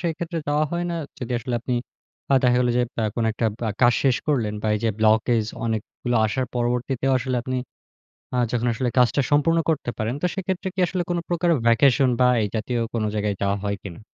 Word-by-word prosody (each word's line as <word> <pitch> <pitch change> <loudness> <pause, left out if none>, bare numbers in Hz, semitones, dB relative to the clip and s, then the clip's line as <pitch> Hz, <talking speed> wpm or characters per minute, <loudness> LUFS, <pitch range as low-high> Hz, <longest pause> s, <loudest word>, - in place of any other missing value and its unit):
সেক্ষেত্রে 170 0 -3
যাওয়া 150 +1 +2
হয় 175 0 -1
না? 170 - -2 0.2
যদি 125 -1 -4
আসলে 120 +1 -4
আপনি 125 +1 -2 0.6
আ - - +7
দেখা 125 -1 +4
গেল 125 - +2
যে 125 - +3 0.2
আ - - +1
কোন 115 - +1
বা - - +2
একটা 115 +1 -1 0.4
কাজ 120 0 +6
শেষ 130 -3 +4
করলেন 115 -8 0
বা - - -1
এই - - 0
যে 115 - +3
ব্লকেজ 110 +1 +3 0.2
অনেকগুলো 115 +2 -2
আসার 130 +4 -1
পরবর্তীতেও 125 +2 0
আসলে 125 0 -2
আপনি 130 0 -3 0.8
আ - - +1
যখন 120 0 0
আসলে 125 +1 -1
কাজটা 125 +3 +4
সম্পূর্ণ 155 +3 +3
করতে 145 -5 -1
পারেন 110 +3 -1
তো - - +3
সেক্ষেত্রে 190 -1 -2
কি 190 - -2
আসলে 180 +1 -2
কোন 175 - +1
প্রকারের 170 -3 +2
ভ্যাকেশন 130 +2 +4
বা 125 - +6
এই 105 - 0
জাতীয় 115 +2 -1
কোন 115 - 0
জায়গায় 105 -1 -1
যাওয়া 100 0 +1
হয় 100 0 -1
কি - - -6
না? - - -13
125 Hz, 210 wpm, -23 LUFS, 115-150 Hz, 0.8 s, আ